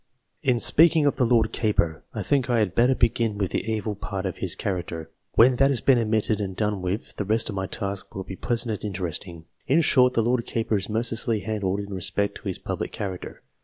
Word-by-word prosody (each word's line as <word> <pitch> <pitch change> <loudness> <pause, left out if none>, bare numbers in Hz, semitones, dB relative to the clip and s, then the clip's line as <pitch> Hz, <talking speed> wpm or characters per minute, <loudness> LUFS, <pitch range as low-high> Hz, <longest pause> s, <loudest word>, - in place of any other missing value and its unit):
In 125 -3 +2
speaking 160 +3 +5
of 145 - +2
the 125 - +2
Lord 115 -2 +3
Keeper, 85 -8 0
I - - -4
think 135 -3 +1
I 120 - +2
had 105 -5 +1
better 125 +4 +3
begin 115 -3 +1
with 100 -3 -1
the 110 - -2
evil 110 -1 -2
part 100 -1 -5
of 95 - -3
his - - -1
character. 85 -4 -4 0.2
When 125 +2 +6
that 135 +1 +4
has 135 -4 +1
been 130 +1 +4
admitted 110 -1 0
and 95 -2 -4
done 105 -2 -1
with, 90 +4 -4
the - - -1
rest 110 +3 0
of 100 - -4
my 95 -1 -2
task 100 -1 -5
will 95 - -4
be 95 - -8
pleasant 115 +3 -1
and - - -3
interesting. 90 -3 -4 0.2
In 150 +6 +4
short, 125 -5 +4
the 115 - +3
Lord 120 +1 +1
Keeper 110 -2 0
is 100 - -4
mercilessly 115 0 0
handled 100 -1 -2
in 100 0 -7
respect 100 +2 -1
to - - -9
his - - -2
public - - -4
character. 95 -3 -6
110 Hz, 225 wpm, -25 LUFS, 95-120 Hz, 0.2 s, When